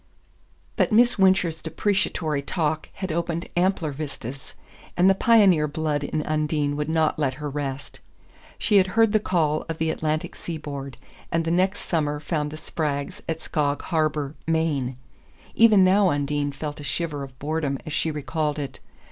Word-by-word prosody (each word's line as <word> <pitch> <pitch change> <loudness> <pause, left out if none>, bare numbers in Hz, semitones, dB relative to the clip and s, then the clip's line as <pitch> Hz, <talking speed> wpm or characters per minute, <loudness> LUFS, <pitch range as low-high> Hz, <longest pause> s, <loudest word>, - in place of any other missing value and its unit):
But - - +2
Miss 235 0 +4
Wincher's 185 -4 +3
depreciatory 165 -3 0
talk 155 +1 -2
had 190 -2 -4
opened 170 +1 -2
ampler 175 -3 +1
vistas, 135 -2 -7 0.4
and 180 - +5
the 195 - +7
pioneer 195 -7 +5
blood 150 -1 -1
in 155 +1 -2
Undine 150 -1 0
would 150 +1 -2
not 160 -1 +1
let 135 -3 0
her 150 +1 -5
rest. 140 -1 -5 0.6
She 210 - +3
had 190 -1 +5
heard 225 -2 +5
the 215 - +4
call 160 -6 +1
of 165 - -3
the 160 0 0
Atlantic 155 0 -2
seaboard, 145 -5 -6 0.3
and 165 0 +1
the 165 - 0
next 185 +3 +1
summer 150 -3 -1
found 150 -1 -2
the 155 - -8
Spraggs 155 +4 -3
at 160 0 -2
Skog 145 -3 -1
Harbour, 155 -3 0
Maine. 150 -6 0 0.6
Even 220 -4 +6
now 190 +1 +5
Undine 145 0 0
felt 145 +2 -6
a - - -7
shiver 150 -1 -2
of 135 -2 -9
boredom 145 -1 -1
as 155 - -5
she 160 - 0
recalled 150 0 -2
it. 140 -2 -5
155 Hz, 165 wpm, -24 LUFS, 145-175 Hz, 0.6 s, the